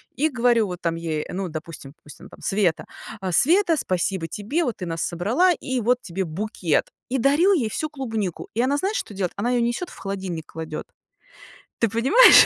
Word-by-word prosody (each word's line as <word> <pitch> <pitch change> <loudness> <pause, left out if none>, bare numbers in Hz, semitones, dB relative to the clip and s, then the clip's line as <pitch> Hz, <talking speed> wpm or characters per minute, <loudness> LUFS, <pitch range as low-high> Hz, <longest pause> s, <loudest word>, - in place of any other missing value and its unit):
и 310 +3 +2
говорю 240 -4 +3
вот 180 -1 -6
там 165 -1 0
ей, 160 -2 -3
ну, 190 +1 -2
допустим 155 -3 -8
допустим, 145 -2 -13
Света: 195 -5 +1 0.4
"А, 185 -1 -2
Света, 335 - +4
спасибо 185 - -1
тебе, 220 - -1
вот 245 - -2
ты 185 - -5
нас 165 0 -3
собрала, 225 - +2
и 260 -5 -3
вот 245 +3 +2
тебе 190 -1 -3
букет". 175 -1 0 0.2
И 260 +1 0
дарю 295 +10 +4
ей 255 - +1
всю 310 +8 -2
клубнику. 225 - -4
И 230 - +2
она 265 +3 +2
знаешь, 395 +8 0
что 355 - -4
делает? 190 -3 -1
Она 240 +5 0
её 245 -1 +2
несёт 240 +10 -1
в - - -13
холодильник 190 -5 -4
кладёт. 160 -1 -5 0.9
Ты 230 - +3
понимаешь? 265 - +8
215 Hz, 190 wpm, -24 LUFS, 175-265 Hz, 0.9 s, понимаешь